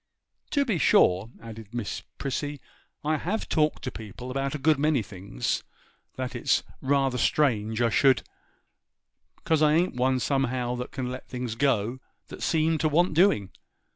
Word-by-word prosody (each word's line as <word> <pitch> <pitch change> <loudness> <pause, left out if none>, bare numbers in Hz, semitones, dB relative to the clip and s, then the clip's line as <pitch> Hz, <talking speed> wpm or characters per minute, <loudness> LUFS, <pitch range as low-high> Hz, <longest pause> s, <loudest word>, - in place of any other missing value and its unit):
To 285 -2 +2
be 215 -9 0
sure,' 95 -5 +4
added 110 0 -10
Miss 120 -4 -3 0.2
Prissy, 145 +2 -3 0.5
'I 155 +1 +2
have 200 +9 -2
talked 155 -1 +1
to 130 - -3
people 110 +4 -8
about 135 +2 -2
a - - -1
good 150 +1 +2
many 150 -5 +2
things 95 - -3 0.5
that 130 -1 -4
it's - - +1 0.2
rather 135 -2 +1
strange 110 -3 +1
I 115 - +3
should, 135 +2 +4 1.2
'cause 160 -2 +2
I 150 -1 +5
ain't 175 +3 +2
one 130 +1 +1
somehow 130 -2 0
that 125 - -5
can 125 -2 -4
let 130 - -7
things 125 -3 -4
go 120 -1 +1 0.3
that - - -9
seem 160 0 +1
to 155 - +2
want 170 +3 +3
doing. 155 - +3
130 Hz, 160 wpm, -27 LUFS, 120-150 Hz, 1.2 s, I